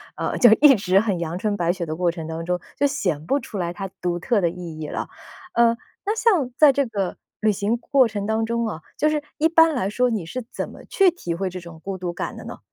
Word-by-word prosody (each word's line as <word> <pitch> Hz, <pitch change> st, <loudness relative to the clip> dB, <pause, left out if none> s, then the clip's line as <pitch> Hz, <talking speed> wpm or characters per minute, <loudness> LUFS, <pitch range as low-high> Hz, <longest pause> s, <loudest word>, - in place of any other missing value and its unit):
呃， -, -, -2 dB
就 240 Hz, -, +7 dB
一 295 Hz, -3 st, +8 dB
直 190 Hz, -3 st, +1 dB
很 200 Hz, -5 st, -1 dB
阳 170 Hz, 0 st, -3 dB
春 205 Hz, +1 st, -1 dB
白 175 Hz, -1 st, +1 dB
雪 180 Hz, -2 st, -4 dB
的 155 Hz, -, -4 dB
过 175 Hz, +1 st, +1 dB
程 165 Hz, -2 st, -5 dB
当 160 Hz, +1 st, -5 dB
中， 180 Hz, +1 st, 0 dB, 0.2 s
就 285 Hz, +2 st, +3 dB
显 180 Hz, -, -2 dB
不 275 Hz, -, +2 dB
出 210 Hz, -, -7 dB
来 175 Hz, -2 st, -2 dB
它 195 Hz, +2 st, -5 dB
独 175 Hz, -1 st, -1 dB
特 210 Hz, +6 st, +1 dB
的 175 Hz, -3 st, +2 dB
意 170 Hz, -2 st, -8 dB
义 155 Hz, -, -4 dB
了。 -, -, -4 dB, 0.4 s
呃， 235 Hz, 0 st, +4 dB, 0.3 s
那 420 Hz, +2 st, 0 dB
像 370 Hz, -, +2 dB
在 300 Hz, -2 st, +7 dB
这 280 Hz, +1 st, +1 dB
个 200 Hz, -6 st, -3 dB, 0.2 s
旅 215 Hz, 0 st, +4 dB
行 205 Hz, +3 st, 0 dB
过 260 Hz, +1 st, +3 dB
程 205 Hz, -2 st, -4 dB
当 220 Hz, +1 st, 0 dB
中 235 Hz, +1 st, -1 dB
啊， 170 Hz, -7 st, -4 dB, 0.2 s
就 305 Hz, -, +3 dB
是 305 Hz, -1 st, 0 dB, 0.2 s
一 320 Hz, +2 st, +3 dB
般 325 Hz, 0 st, +5 dB
来 200 Hz, -6 st, 0 dB
说 250 Hz, +4 st, +1 dB
你 215 Hz, -7 st, -2 dB
是 255 Hz, +10 st, -5 dB
怎 -, -, -4 dB
么 -, -, -13 dB
去 390 Hz, -2 st, +4 dB
体 175 Hz, -, -4 dB
会 190 Hz, +2 st, -2 dB
这 185 Hz, 0 st, -7 dB
种 170 Hz, -2 st, -12 dB
孤 195 Hz, -1 st, -4 dB
独 175 Hz, -1 st, -4 dB
感 -, -, -5 dB
的 -, -, -9 dB
呢？ -, -, -8 dB
200 Hz, 280 characters per minute, -23 LUFS, 175-250 Hz, 0.4 s, 一